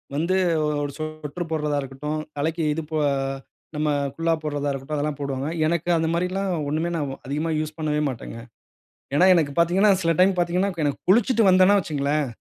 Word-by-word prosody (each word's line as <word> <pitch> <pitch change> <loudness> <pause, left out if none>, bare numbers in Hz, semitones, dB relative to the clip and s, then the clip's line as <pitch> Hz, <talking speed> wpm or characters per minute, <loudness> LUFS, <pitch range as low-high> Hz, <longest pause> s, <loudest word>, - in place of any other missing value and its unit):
வந்து 170 +5 +1 0.3
ஒ - - +1 0.2
ஒரு 145 - -3
சொட்டரு 155 +1 -5
போடுறதா 150 -2 0
இருக்கட்டும், 140 +3 -4 0.2
தலைக்கு 160 +3 -1
இது 160 - -3
போ 155 - -1 0.8
நம்ம 150 0 0 0.3
குல்லா 165 +1 +1
போடுறதா 145 -1 -2
இருக்கட்டும். 135 +2 -4
அதெல்லாம் 145 0 -2
போடுவாங்க. 140 -1 -3 0.2
எனக்கு 170 +1 -1
அந்த 160 0 0
மாரிலாம் 185 +3 -1 0.2
ஒண்ணுமே 160 +3 -1
நான் 145 -4 -2
அதிகமா 150 +5 -2
யூஸ் 155 0 -4
பண்ணவே 150 -1 -1
மாட்டேங்க. 115 -2 -7 0.8
ஏன்னா 175 +6 +5
எனக்கு 155 -5 +1
பார்த்தீங்கன்னா 180 +5 +4
சில 165 -1 +2
டைம் 190 +1 +5
பார்த்தீங்கன்னா, 180 +3 +1
கு 165 - -3
எனக்கு 145 -1 -1
குளிச்சுட்டு 225 +1 +4
வந்தன்னா 185 +2 +6
வச்சுக்கங்களேன், 150 -4 -1
155 Hz, 170 wpm, -24 LUFS, 145-175 Hz, 0.8 s, வந்தன்னா